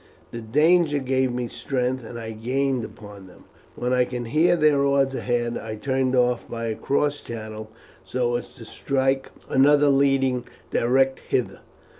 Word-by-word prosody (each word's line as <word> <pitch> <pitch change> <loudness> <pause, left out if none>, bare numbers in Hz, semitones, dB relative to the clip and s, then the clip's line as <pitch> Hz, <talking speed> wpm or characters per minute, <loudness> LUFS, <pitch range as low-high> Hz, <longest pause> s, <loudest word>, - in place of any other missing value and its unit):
The 115 - -6
danger 150 +6 +3
gave 130 -1 0
me 120 0 -3
strength, 130 0 -2
and 120 +1 -8
I 115 -1 -6
gained 130 +3 -1
upon 105 -3 -11
them. 90 - -17 0.3
When 125 +1 -1
I 125 0 +3
could 125 -1 -5
hear 160 +9 +3
their 150 -3 +3
oars 140 -1 +2
ahead 120 -2 -1
I 110 -1 -6
turned 130 +2 0
off 125 -1 +1
by 115 0 -4
a 110 - -2
cross 145 +3 0
channel 110 -1 -7 0.3
so 120 -1 -1
as 120 - -5
to 120 -4 -11
strike 135 +2 -1 0.2
another 145 +2 +4
leading 135 -2 +2 0.3
direct 130 +2 +2
hither. - - -2
130 Hz, 160 wpm, -24 LUFS, 120-140 Hz, 0.3 s, another